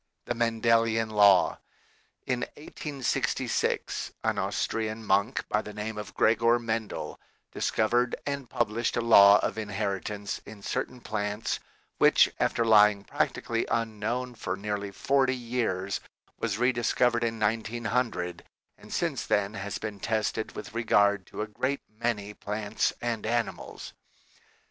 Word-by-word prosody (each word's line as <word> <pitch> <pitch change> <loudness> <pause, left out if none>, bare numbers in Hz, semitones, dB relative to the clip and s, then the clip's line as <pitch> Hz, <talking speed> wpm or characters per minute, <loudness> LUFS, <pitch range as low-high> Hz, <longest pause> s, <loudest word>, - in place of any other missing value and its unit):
THE - - -1
MENDELIAN 115 -1 +2
LAW 100 -3 +5 0.7
In 125 -1 0 0.2
1866 145 -3 -2
an - - +1
Austrian 110 0 -2
monk 100 +6 +1
by 105 - +1
the 105 -1 -9
name 105 0 -4
of 105 - -8
Gregor 115 +2 +4
Mendel 115 -2 -3 0.3
discovered 120 +3 +1
and 140 -3 -3
published 115 +2 0
a - - +2
law 100 -3 +8
of 110 - -2
inheritance 105 -1 -3
in 105 -2 -12
certain 125 +4 -3
plants, 105 0 -2 0.4
which, - - +6
after 115 - +1
lying 105 -2 +6
practically 115 +2 -1
unknown 115 +2 -1
for 105 -5 -3
nearly 100 0 -3
forty 130 +5 +1
years, 115 -6 -2 0.4
was 105 -3 -2
rediscovered 120 0 +2
in 115 -1 -1
1900 110 -4 -1 0.4
and - - -14
since - - -1
then 100 0 +1
has 105 -1 -4
been 105 -2 -6
tested 110 +1 -1
with 105 - -8
regard 100 -4 +2
to - - -4
a - - -5
great 130 +6 -2
many 110 -2 -3
plants 105 +1 -1
and 115 -3 -2
animals. 115 -1 -3
110 Hz, 125 wpm, -28 LUFS, 105-120 Hz, 0.7 s, law